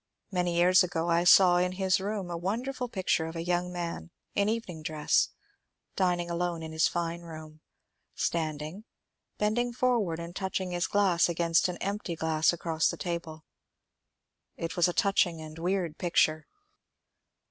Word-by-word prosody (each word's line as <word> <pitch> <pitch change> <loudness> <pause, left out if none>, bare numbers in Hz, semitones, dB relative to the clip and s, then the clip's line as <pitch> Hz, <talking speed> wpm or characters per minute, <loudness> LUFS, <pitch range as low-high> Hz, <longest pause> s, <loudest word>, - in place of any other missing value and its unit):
Many 180 -2 0
years 180 +2 +5
ago 170 -1 -1
I 170 +1 +3
saw 180 -1 +7
in 180 +1 +1
his 190 0 +1
room 195 -2 -3
a - - -2
wonderful 245 +8 -3
picture 185 -6 0
of 165 - -7
a 165 - -3
young 175 +1 -1
man 170 - -5 0.2
in 200 +1 +1
evening 215 -8 -3
dress 155 -1 +1 0.7
dining 180 -2 +1
alone 170 -1 -2
in 160 - -6
his 160 0 +3
fine 170 0 -3
room, 155 -2 -10 0.5
standing, 160 +4 -3 0.5
bending 240 +4 0
forward 235 -9 +1
and 170 +1 -7
touch 190 -1 -2
ing 185 -1 -4
his 175 0 -1
glass 190 -4 +3
against 170 0 +2
an 180 -1 -4
empty 200 -3 -3
glass 160 -1 +2
across 165 -2 0
the - - -2
table. 170 -3 -5 1.1
It 165 0 -4
was 175 0 +4
a 175 - -1
touching 180 -4 +2
and 155 0 -9
weird 175 -2 -1
picture. 160 -3 +2
175 Hz, 160 wpm, -29 LUFS, 165-190 Hz, 1.1 s, saw